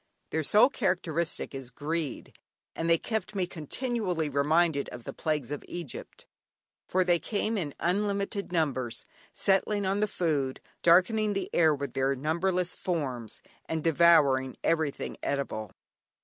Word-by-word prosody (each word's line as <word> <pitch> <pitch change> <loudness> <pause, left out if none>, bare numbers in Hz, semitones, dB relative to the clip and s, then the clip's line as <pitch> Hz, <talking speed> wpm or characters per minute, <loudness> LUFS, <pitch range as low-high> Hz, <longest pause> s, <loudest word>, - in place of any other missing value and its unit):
Their 160 - 0
sole 210 - +5
characteristic 175 - -1
is 135 -2 -7
greed, 145 +1 -4 0.4
and 165 - -1
they 165 - +6
kept 215 +2 -3
me 190 -2 +1
continually 180 - -2
reminded 145 +1 +2
of 120 -1 -9
the - - -6
plagues 150 -5 -2
of 145 - -4
Egypt, 170 -7 -7 0.6
for 185 0 +2
they 175 -1 +3
came 215 +3 -1
in 155 -9 -3
unlimited 200 +2 -1
numbers, 130 -8 -1 0.3
settling 200 +1 +1
on 195 +2 +1
the 210 - +2
food, 145 -9 -1 0.2
darkening 205 +5 +4
the 195 -1 -3
air 160 -3 +4
with 140 -3 -5
their 135 +1 +1
numberless 175 +5 0
forms, 130 - -3 0.2
and 160 -1 -3
devouring 145 -6 +4
everything 160 -4 0
eatable! 110 -7 -2
165 Hz, 135 wpm, -29 LUFS, 140-190 Hz, 0.6 s, they